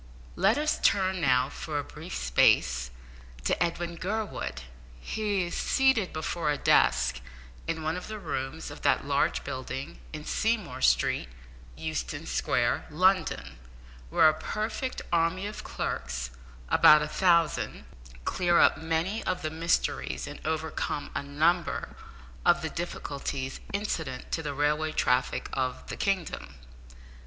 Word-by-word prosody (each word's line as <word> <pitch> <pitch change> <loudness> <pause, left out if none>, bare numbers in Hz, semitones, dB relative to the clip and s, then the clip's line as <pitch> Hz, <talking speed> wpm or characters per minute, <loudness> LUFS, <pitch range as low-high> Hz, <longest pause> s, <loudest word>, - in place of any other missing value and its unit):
Let 200 +6 +3
us 300 +1 +1
turn 190 -2 +2
now, 130 -3 +4
for 150 0 -4
a 145 - -1
brief - - -8
space, 60 0 +3 0.5
to - - +2
Edwin 170 0 -3
Gurwood. 170 - -3 0.4
He 205 - -1
is 175 - -4
seated 265 -8 +2
before 160 0 -2
a 145 - +1
desk 65 - +3 0.5
in 165 -1 -2
one 160 +2 0
of 180 - -6
the 215 0 -5
rooms 160 -4 -4
of - - -10
that - - +2
large - - +1
building - - -5
in - - -7
Seymour 65 +1 -1
Street, 65 0 +2 0.5
Euston 80 -6 -3
Square, - - 0
London, 155 - +1 0.5
where 155 - +6
a 155 - +5
perfect 215 +10 -3
army 170 +3 +2
of 210 +1 -6
clerks 60 -1 -3 0.4
about 150 - +7
a - - -2
thousand 170 -1 +2 0.4
clear 175 -2 +2
up - - +5
many 165 +7 -1
of 185 - -1
the 155 - -2
mysteries, 165 +2 0
and 145 0 -8
overcome 155 -2 -2
a - - -1
number 155 +5 +1 0.5
of 175 -1 +4
the 160 - -2
difficulties, 140 -5 -4
incident 160 -10 -3
to 160 - 0
the 145 -3 -4
railway 150 +2 +1
traffic 125 -4 +1
of 130 -1 -2
the - - -4
kingdom. 170 - -2
160 Hz, 135 wpm, -28 LUFS, 135-180 Hz, 0.5 s, about